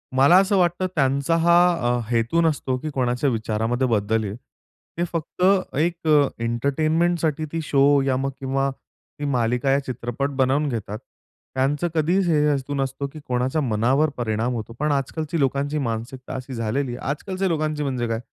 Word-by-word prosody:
मला 140 +6 +6
असं 195 +1 +1
वाटतं 180 +1 +1
त्यांचा 140 +2 +2
हा 170 +1 +4 0.4
अ, - - -2
हेतू 120 +7 +1
नसतो, 145 -5 0
की 155 +4 -5
कोणाच्या 125 +1 0
विचारामध्ये 115 +2 -1
बदल 110 -1 +1
येईल. 100 -1 -4 0.6
ते 170 - +1
फक्त 165 +2 -3 0.3
एक 165 +2 -1
अ, 150 -2 +5 0.2
एंटरटेनमेंटसाठी 155 +6 0
ती 165 - -2
शो 140 -1 +4
या 135 -1 +1
मग 135 +1 -1
किंवा 135 +1 0 0.5
ती 145 - -3
मालिका 125 0 +1
या 135 - +3
चित्रपट 125 +2 -3
बनवून 135 +3 +2
घेतात. 110 -3 -4 0.6
त्यांचं 140 +6 +1
कधीच 175 +4 +2
हे 160 -3 +3
हेतू 145 -1 -1
नसतं, 135 0 -2
की 155 - -8
कोणाच्या 125 +4 0
मनावर 130 +5 +2
परिणाम 115 +1 -1
होतो. 115 -1 -5
पण 150 +1 +1
आज-कालची 155 +4 -2
लोकांची 140 +2 0
मानसिकता 125 0 -4
अशी 130 0 -6
झालेली 120 +3 -2
आहे. 125 - -7
आज-कालच्या 185 +6 -2
लोकांची 155 -3 -1
म्हणजे 130 -4 -2
काय? 115 0 -2
135 Hz, 165 wpm, -23 LUFS, 125-155 Hz, 0.6 s, मला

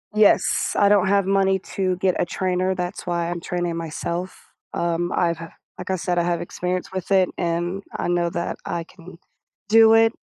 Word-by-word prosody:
Yes, 210 -3 +3
I 200 - +5
don't 200 -2 +4
have 200 -1 +3
money 195 0 +2 0.2
to 185 -2 +1
get 185 -1 +1
a - - +2
trainer, 185 +1 -1
that's 180 -1 -5
why 170 -1 -1
I'm 175 0 -3
training 175 0 -3
myself, 170 +2 -5 0.3
um, 170 0 -1
I've 170 -2 +1
h 165 - -8 0.3
like 185 +1 -5
I 190 - +1
said, 175 0 -2
I 170 - +2
have 175 -1 -1
experience 180 +1 -3
with 190 -1 -5
it, 190 -1 +4
and 175 +3 -2
I - - -2
know 175 -1 +1
that 170 +1 -3
I 170 -1 -3
can 170 0 -14 0.5
do 225 0 +7
it. 225 0 +4
180 Hz, 190 wpm, -22 LUFS, 170-190 Hz, 0.5 s, do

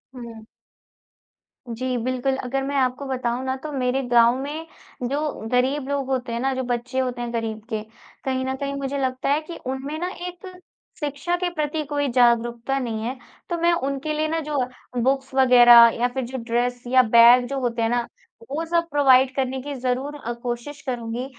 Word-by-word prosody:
हुँ। 230 -3 -9 1.2
जी, 250 +2 -2
बिल्कुल, 255 +1 0
अगर 270 +2 -2
मैं 280 +1 -3
आपको 260 +1 0
बताऊँ 255 -1 -2
ना 260 - -1
तो 305 - -5
मेरे 260 0 0
गाँव 235 +1 +5
में 300 +4 -5 0.4
जो 280 - -1 0.3
ग़रीब 260 +3 +1
लोग 280 -2 -1
होते 255 -2 -2
हैं 235 - -2
ना, 265 +2 0
जो 260 0 -2
बच्चे 245 +1 -2
होते 250 -2 -2
हैं 240 0 -4
ग़रीब 225 -2 -3
के, 220 -2 -2 0.4
कहीं 260 -1 -1
न 265 - -2
कहीं 280 0 -3
मुझे 275 0 -3
लगता 260 +1 -1
है 295 +2 +2
कि 330 +2 -9
उनमें 265 +4 -4
ना 360 +1 -2 0.2
एक 360 +2 -9 0.5
शिक्षा 295 +4 -2
के 355 0 -1
प्रति 305 0 -2
कोई 285 -1 0
जागरूकता 240 +1 +2
नहीं 225 -3 -3
है। 255 +3 -3 0.3
तो 345 - -1
मैं 340 +1 +3
उनके 280 0 -2
लिए 310 +1 0
ना 325 +1 -1
जो 295 - -1 0.5
बुक्स 270 +1 0
वग़ैरह 240 -3 +8
या 245 - +3
फिर 265 -2 -2
जो 260 +2 -6
ड्रेस 240 +1 -1
या 255 +1 +6
बैग 235 +2 +7
जो 275 0 -3
होते 235 -2 -1
हैं 225 - +2
ना, 240 0 0 0.4
वो 315 +3 -2
सब 335 0 0
प्रोवाइड 265 -2 +5
करने 265 -1 -1
की 285 +2 -6
ज़रूर 260 +4 -2
अ, 240 -5 -5
कोशिश 240 +4 -6
करूँगी। 245 -2 -4
260 Hz, 190 wpm, -23 LUFS, 240-280 Hz, 1.2 s, वग़ैरह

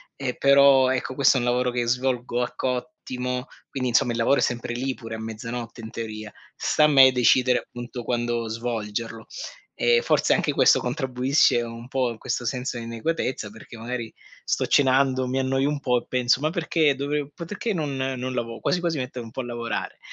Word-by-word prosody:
e 130 -2 -3
però, 140 -1 +6
ecco, 130 0 -2
questo 140 -1 +4
è - - +2
un 120 - -2
lavoro 125 +1 +1
che 120 -1 -1
svolgo 125 -1 0
a - - -4
cottimo, 125 -1 -3 0.2
quindi 130 -2 -2
insomma 120 +1 +3
il 115 - -2
lavoro 115 +5 +3
è - - +1
sempre 120 -1 -1
lì 130 +2 -2
pure 115 -2 -8
a - - -7
mezzanotte 115 +2 -6
in 110 - -7
teoria; 110 -2 -6 0.2
sta 150 - +1
a - - +7
me 135 -3 +7
decidere, 125 0 +4
appunto, 120 0 -8
quando 120 -1 -1
svolgerlo. 115 -1 -4 0.5
E 475 0 +4
forse - - +2
anche - - +1
questo - - +5
contribuisce 130 -1 +2
un 115 +1 -7
po' 130 -2 0
a 115 - -7
questo 120 - -3
senso 125 +1 -2
inadeguatezza, 115 -1 -3
perché 115 +1 -12
magari 120 0 -5 0.3
sto - - 0
cenando, 130 -1 +3
mi 130 +1 -2
annoio 135 +1 +1
un 150 -1 -2
po' 125 -3 +1
e - - -21
penso: 125 +1 +2
"Ma 155 - +1
perché 160 -3 +1
dovev 145 +1 -2
perché 205 +6 -4
non 150 -5 -2
non 130 -1 -3
lavo 115 -1 -4
quasi 180 - 0
quasi 170 -3 -1
metto 125 -1 -4
un 115 - -9
po' 130 - -5
a 120 - -7
lavorare". 120 -2 -4
125 Hz, 195 wpm, -24 LUFS, 120-135 Hz, 0.5 s, a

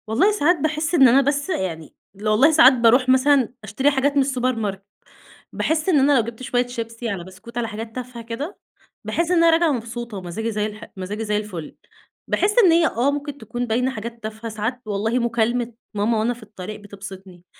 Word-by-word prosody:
والله 260 - +3
ساعات 355 -3 +2
باحس 310 +3 -1
إن 270 -5 +7
أنا، 260 +3 +5
بس 285 +3 -1
يعني 165 - -3 0.3
والله 220 +8 +4
ساعات 305 -4 +7
بارُوح 250 +1 +4
مثلًا 260 -1 +4
أشتري 240 +8 +1
حاجات 280 +1 +1
من 280 - +5
السوبر 255 -2 0
ماركت 200 -3 -4 0.7
باحس 315 +2 0
إن 310 -6 +4
أنا 280 +2 +4
لو - - +4
جِبت 235 +2 -8
شوية 245 0 0
شيبسي 230 -1 -5
على 195 -4 -4
بسكوت 190 +6 -12
على 235 -1 -1
حاجات 225 +1 -7
تافهة 250 -2 -7
كده، 255 - -6 0.5
باحس 335 +1 -1
إن 360 - +3
أنا 335 0 +5
راجعة 330 -1 +3
مبسوطة 235 -3 -5
ومزاجي 195 +5 -4
زي 210 -1 -1
الح 215 0 -8
ومزاجي 200 +4 -4
زي 210 0 0
الفل، 190 -7 -6 0.5
باحس 415 +1 +1
إن 350 - +6
هي 330 0 +4
آه، 250 +5 +1
ممكن 290 0 -5
تكون 240 +1 -4
باينة 250 +4 +1
حاجات 230 -1 -7
تافهة، 220 +1 -6
ساعات 220 +4 -3
والله 215 +4 -1
مكالمة 235 0 0 0.2
ماما 215 +2 +1
وأنا 230 +3 +1
في 240 -1 -14
الطريق 210 0 -8
بتبسِطني، 195 -3 -11
235 Hz, 195 wpm, -22 LUFS, 215-275 Hz, 0.7 s, إن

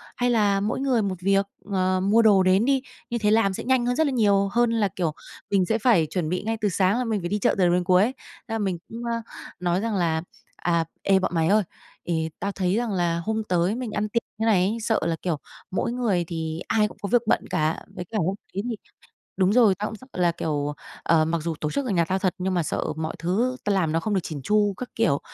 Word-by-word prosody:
hay 245 0 +1
là 205 -4 +3
mỗi 210 +6 -1
người 260 -4 +2
một 195 -2 -1
việc, 195 +1 +3 0.3
ờ, 185 -1 +1
mua 215 +4 +4
đồ 200 -4 +5
đến 190 +5 +4
đi, 270 -1 +2 0.3
như 235 - -1
thế 210 -1 +2
làm 215 -3 +3
sẽ - - -5
nhanh 255 -2 +2
hơn 245 0 +1
rất 315 0 +2
là - - 0
nhiều 200 -4 +3
hơn 240 -1 +2
là, 220 -3 +2
kiểu, 170 -3 -2 0.4
mình 195 -3 +3
sẽ 220 +5 +1
phải 205 -9 +3
chuẩn 170 -4 -2
bị 180 +2 -2
ngay 225 +1 -1
từ 210 - +2
sáng 190 +3 +2
là 250 - 0
mình 220 -3 -1
phải 175 - -3
đi 210 - 0
chợ - - +3
từ 185 - +3
đầu 175 0 +4
đến 180 0 +2
cuối. 185 +2 +4 0.4
Thế 225 - -5
là - - 0
mình 190 -4 -1
cũng, 235 +1 -7
a, 230 0 -1 0.4
nói 180 0 +1
rằng 220 -1 -1
là 165 -3 +1 0.3
"À, 170 -2 0 0.2
ê, 195 -1 +3
bọn 185 - -1
mày 160 -1 +2
ơi, 210 +2 +4 0.4
thì 160 -1 0
tao 200 +2 -2
thấy 185 -1 0
rằng 235 0 -1
là 170 -2 0
hôm 220 +5 -2
tới 180 +1 +1
mình 245 -3 -4
ăn 210 0 -2
tiệc 235 +2 0
như - - -91
thế 225 - 0
này 210 -5 +4
ấy 220 +3 -1
sợ 225 0 +1
là, 165 -1 +1
kiểu, 170 -5 -1 0.3
mỗi 230 - -1
người 225 -8 0
thì 160 -1 -4
ai 210 -1 +3
cũng - - -13
có 200 - -3
việc 245 -1 +4
bận - - +1
cả, 155 +1 -1
với 180 - -5
cả 220 +5 -4
hôm 190 0 0 0.2
đấy 200 +2 -2
thì 230 - -2 0.6
đúng 190 +1 +3
rồi, 225 -5 +5
tao 210 +2 -3
cũng 220 - -7
sợ 255 - -15
là, 175 -2 +2
kiểu, 150 -3 -2 0.3
ờ, 160 -2 +3
mặc 165 +1 0
dù 165 0 -2
tổ 150 - -1
chức 280 - -1
ở 240 - -2
nhà 170 -3 +3
tao 185 +3 -1
thật 185 -2 0
nhưng 185 +1 -1
mà 175 - +2
sợ - - -2
mọi 160 0 -3
thứ 225 +10 0
tao 205 - +1
làm 165 -5 +1
nó 165 - +1
không 215 +2 -1
được 190 - +2
chỉn 150 -5 -6
chu, 205 +5 +2
các 250 - -6
kiểu. 220 -11 +2
195 Hz, 270 wpm, -25 LUFS, 175-225 Hz, 0.6 s, đồ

